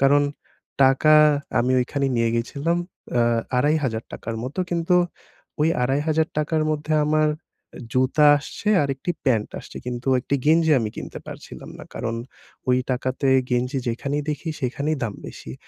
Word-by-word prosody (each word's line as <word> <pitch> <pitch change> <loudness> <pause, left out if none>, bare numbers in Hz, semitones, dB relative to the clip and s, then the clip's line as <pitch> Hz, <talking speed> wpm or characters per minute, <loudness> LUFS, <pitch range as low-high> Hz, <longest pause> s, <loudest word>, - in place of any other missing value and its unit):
কারণ 140 +1 +5 0.6
টাকা 135 +3 +5 0.4
আমি 125 +2 +2
ওইখানেই 135 +2 -1
নিয়ে 115 -1 +2
গেছিলাম 140 +8 -1 0.4
অ্যা 120 -1 +3 0.3
৳২,৫০০ 135 -8 -1
র - - -4
মতো। 135 +8 -7
কিন্তু 175 +1 +2 0.6
ওই 155 - +4
৳২,৫০০ 150 +3 0
র - - +2
মধ্যে 155 +1 -3
আমার 155 0 +3 0.6
জুতা 130 +4 +3
আসছে 150 +8 -6
আর 140 - -1
একটি 135 +6 -4
প্যান্ট 115 -5 +2
আসছে। - - -13
কিন্তু 125 +1 -4
একটি 140 - -2
গেঞ্জি 160 +1 +4
আমি 110 -1 -2
কিনতে - - -6
পারছিলাম - - -10
না। - - -9
কারণ 115 - -3 0.5
ওই 125 0 +4
টাকাতে 130 +2 -1 0.2
গেঞ্জি 125 +2 0
যেখানেই 140 +5 -2
দেখি, 155 +3 -4
সেখানেই 140 +4 -1
দাম 105 - -4
বেশি 65 - -9
140 Hz, 145 wpm, -23 LUFS, 125-155 Hz, 0.6 s, কারণ